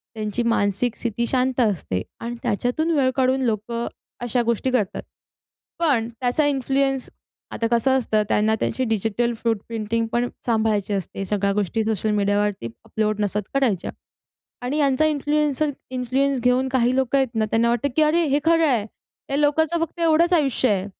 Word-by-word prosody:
त्यांची 215 Hz, +2 st, -2 dB
मानसिक 230 Hz, +1 st, 0 dB
स्थिती 235 Hz, 0 st, -2 dB
शांत 260 Hz, 0 st, 0 dB
असते 180 Hz, -, 0 dB, 0.2 s
आणि 235 Hz, +1 st, -5 dB
त्याच्यातून 245 Hz, +8 st, 0 dB
वेळ 260 Hz, -2 st, +3 dB
काढून 260 Hz, 0 st, +2 dB
लोकं 230 Hz, +1 st, -2 dB, 0.3 s
अशा 245 Hz, 0 st, 0 dB
गोष्टी 235 Hz, +3 st, 0 dB
करतात. 215 Hz, -7 st, 0 dB, 0.8 s
पण 275 Hz, -9 st, +2 dB
त्याचा 245 Hz, +5 st, 0 dB
इन्फ्लुअन्स 270 Hz, -1 st, 0 dB, 0.4 s
आता 230 Hz, -, -1 dB
कसं 250 Hz, +3 st, +3 dB
असतं, 220 Hz, -4 st, +1 dB
त्यांना 215 Hz, +1 st, +2 dB
त्यांची 260 Hz, -, -1 dB
डिजिटल 225 Hz, +2 st, 0 dB
फ्रूट 230 Hz, -2 st, +1 dB
प्रिंटिंग 225 Hz, 0 st, -2 dB
पण 240 Hz, +1 st, +1 dB, 0.2 s
सांभाळायची 220 Hz, -3 st, +1 dB
असते. 195 Hz, 0 st, -4 dB
सगळ्या 200 Hz, 0 st, 0 dB
गोष्टी 210 Hz, +2 st, 0 dB
सोशल 215 Hz, -1 st, -1 dB
मीडियावरती 205 Hz, -, 0 dB, 0.2 s
अपलोड 215 Hz, -1 st, -1 dB
नसत 205 Hz, 0 st, -2 dB
करायच्या 245 Hz, -10 st, 0 dB, 0.7 s
आणि 270 Hz, +4 st, -1 dB
यांचा 280 Hz, 0 st, +2 dB
इन्फ्लुएन्सर 300 Hz, 0 st, +1 dB, 0.2 s
इन्फ्लुअन्स 260 Hz, +1 st, 0 dB
घेऊन 250 Hz, +2 st, +2 dB
काही 255 Hz, -1 st, +2 dB
लोकं 265 Hz, 0 st, +1 dB
आहेत 265 Hz, -1 st, +2 dB
ना, 220 Hz, -1 st, +2 dB
त्यांना 225 Hz, +2 st, +1 dB
वाटतं 240 Hz, +4 st, 0 dB
की 315 Hz, -, +3 dB
"अरे, 320 Hz, +3 st, +3 dB
हे 285 Hz, +1 st, +2 dB
खरं 330 Hz, 0 st, +4 dB
आहे." 235 Hz, -7 st, +1 dB, 0.4 s
या 275 Hz, -, 0 dB
लोकांचं 320 Hz, +3 st, +2 dB
फक्त 335 Hz, +1 st, -7 dB
एवढंच 335 Hz, +2 st, +3 dB
आयुष्य 270 Hz, -6 st, +2 dB
आहे 195 Hz, -2 st, 0 dB
240 Hz, 160 wpm, -23 LUFS, 215-270 Hz, 0.8 s, खरं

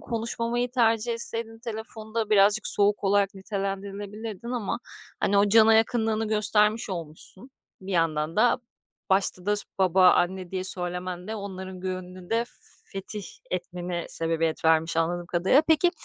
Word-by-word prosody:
konuşmamayı 235 Hz, +1 st, -3 dB
tercih 230 Hz, -2 st, +1 dB
etseydin 230 Hz, -1 st, -2 dB
telefonda 220 Hz, -1 st, -6 dB
birazcık 205 Hz, +1 st, +4 dB
soğuk 205 Hz, 0 st, +7 dB
olarak 200 Hz, 0 st, +2 dB
nitelendirilebilirdin 200 Hz, +2 st, -6 dB
ama, 235 Hz, -4 st, -3 dB, 0.4 s
hani, 200 Hz, 0 st, +2 dB
o 205 Hz, +1 st, +3 dB
cana 220 Hz, +1 st, +6 dB
yakınlığını 225 Hz, -1 st, +1 dB
göstermiş 215 Hz, 0 st, +2 dB
olmuşsun. 175 Hz, -, 0 dB, 0.3 s
Bir 190 Hz, +1 st, -7 dB
yandan 160 Hz, -1 st, 0 dB
da 240 Hz, +4 st, +3 dB, 0.5 s
başta 190 Hz, -1 st, +1 dB
da 210 Hz, 0 st, +2 dB
s -, -, +3 dB, 0.2 s
"baba, 185 Hz, -1 st, +5 dB
anne" 185 Hz, 0 st, -1 dB
diye 185 Hz, -1 st, -3 dB
söylemen 180 Hz, 0 st, 0 dB
de 220 Hz, -, -4 dB
onların 190 Hz, -2 st, -8 dB
gönlünü 185 Hz, -1 st, -7 dB
de 230 Hz, +1 st, +1 dB, 0.5 s
fetih 195 Hz, +1 st, -5 dB, 0.3 s
etmene 175 Hz, -1 st, -4 dB
sebebiyet 165 Hz, -1 st, -2 dB
vermiş 160 Hz, 0 st, +2 dB
anladığım 175 Hz, +1 st, -1 dB
kadarıyla. 180 Hz, -, +3 dB
Peki, 320 Hz, +2 st, +4 dB
200 Hz, 135 wpm, -25 LUFS, 180-220 Hz, 0.5 s, soğuk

